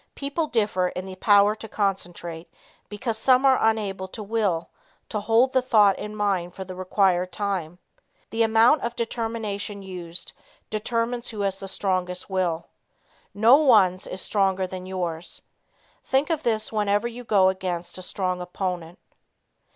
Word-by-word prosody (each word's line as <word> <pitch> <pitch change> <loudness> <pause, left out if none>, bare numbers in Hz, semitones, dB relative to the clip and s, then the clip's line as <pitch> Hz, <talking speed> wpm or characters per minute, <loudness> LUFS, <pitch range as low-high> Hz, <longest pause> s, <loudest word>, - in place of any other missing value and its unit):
People 285 +3 -2
differ 205 -7 +1
in 185 +1 -5
the 190 -1 -8
power 205 +1 +5
to 220 +1 -9
concentrate 175 -5 -3 0.4
because 220 +1 -3
some 255 +2 +4
are 265 -1 +5
unable 205 -4 0
to 215 +3 -8
Will 200 -6 0 0.4
to 215 - -2
hold 230 +5 +3
the 260 - +4
thought 210 -6 +4
in 210 0 -6
mind 195 -4 -1
for 190 - -5
the 185 - -7
required 185 -1 +1
time. 180 -4 -3 0.5
The 225 - -1
amount 225 +6 +5
of 235 0 -3
determination 225 -3 -3
used 180 -2 -7 0.4
determines 230 +2 -2
who 215 -3 -5
has 195 -1 -1
the 195 - -6
strongest 185 -1 -2
will. 175 -3 0 0.7
No 225 +6 +7
one's 205 -11 +4
is 185 - -6
stronger 190 -2 +1
than 185 0 -7
yours. 175 -3 -4 0.6
Think 270 +5 +1
of 315 -2 0
this 220 -4 0
whenever 210 +1 +1
you 240 +1 -8
go 195 -5 +4
against 180 -2 -4
a - - -7
strong 185 -1 -2
opponent. 180 -1 -4
200 Hz, 150 wpm, -25 LUFS, 185-225 Hz, 0.7 s, No